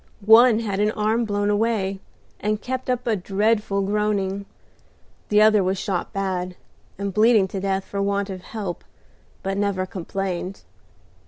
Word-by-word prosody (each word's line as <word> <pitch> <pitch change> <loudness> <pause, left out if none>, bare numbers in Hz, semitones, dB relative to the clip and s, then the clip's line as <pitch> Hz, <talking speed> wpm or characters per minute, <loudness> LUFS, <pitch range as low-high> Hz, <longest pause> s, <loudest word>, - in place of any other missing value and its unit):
One 225 +1 +7
had 200 -3 -2
an 210 +1 +3
arm 220 +2 +1
blown 205 -1 0
away, 205 -3 0 0.4
and 210 0 -1
kept 260 +2 -4
up 250 -1 -1
a 230 -2 +2
dreadful 205 +1 0
groaning. 200 -1 -1 0.8
The 210 0 +5
other 215 -2 +5
was 190 +1 0
shot 185 -1 -2
bad, 185 -2 -2 0.4
and 200 0 -3
bleeding 215 -1 +4
to 195 - -4
death 195 0 -1
for 200 - -3
want 200 0 -1
of 185 -1 -7
help, 195 -3 -6 0.6
but 195 +1 -2
never 200 -2 0
complained. 185 0 -4
200 Hz, 150 wpm, -23 LUFS, 195-215 Hz, 0.8 s, One